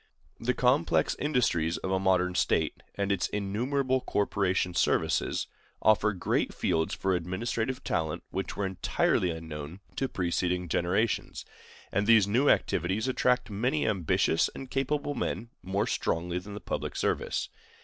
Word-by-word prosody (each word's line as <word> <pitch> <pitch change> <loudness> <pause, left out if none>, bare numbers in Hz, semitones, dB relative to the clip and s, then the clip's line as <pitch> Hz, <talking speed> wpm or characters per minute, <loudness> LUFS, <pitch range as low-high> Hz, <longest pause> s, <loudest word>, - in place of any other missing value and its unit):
The 125 +1 0
complex 130 +6 +2
industries 90 - +1
of 95 - -4
a 95 - +2
modern 90 -1 +2
state, - - +1
and 100 0 -1
its 100 -3 +1
innumerable 130 +6 0
corporation 95 -4 0
services, - - +1 0.3
offer 110 0 +4
great 95 -4 -1
fields 80 0 0
for 95 0 0
administrative 110 +8 -2
talent 80 -1 -1
which 95 -2 -4
were 100 - 0
entirely 95 -1 +1
unknown 80 0 -6 0.2
to 135 - 0
preceding 90 0 -1
generations; 95 +8 0 0.5
and 100 +2 0
these 110 -4 +6
new 125 +8 +3
activities 95 +8 +1
attract 125 -2 +1
many 125 +9 0
ambitious 90 -5 +2
and 135 -1 -8
capable 145 +2 -1
men 120 -3 -3
more 100 +3 -1
strongly 85 -6 -1
than 100 +3 -9
the - - -5
public - - -4
service. - - -1
100 Hz, 140 wpm, -29 LUFS, 90-125 Hz, 0.5 s, these